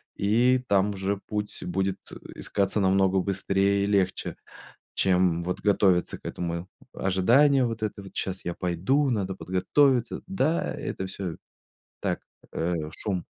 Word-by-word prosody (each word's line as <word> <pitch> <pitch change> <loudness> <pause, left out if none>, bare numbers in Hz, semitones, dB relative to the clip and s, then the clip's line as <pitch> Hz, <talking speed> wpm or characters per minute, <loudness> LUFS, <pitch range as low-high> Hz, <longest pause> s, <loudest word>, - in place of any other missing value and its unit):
и 120 +6 +3
там 100 +1 +3
уже 100 0 -2
путь 105 +1 -5
будет, 95 +2 -1
э, - - -8 0.2
искаться 100 +1 0
намного 95 0 +3
быстрее 100 +1 +1
и - - 0
легче, 95 -2 0 0.6
чем 90 -3 +2
вот 90 +1 -3
готовиться 95 -3 +2
к - - -28
этому. 85 0 -4 0.3
Ожидание 125 +9 +4
вот 115 -1 -4
это 105 -1 -3
вот: 95 - -13
"Сейчас 95 0 -3
я 85 - -1
пойду, 95 - +1
надо 95 -4 -1
подготовиться". 120 +8 +1
Да, 170 -4 0
это 95 - -4
всё 95 -3 -5 0.6
так, - - -2 0.3
э, 85 +2 -1 0.2
шум. 95 -2 -3
95 Hz, 140 wpm, -26 LUFS, 95-105 Hz, 0.6 s, Ожидание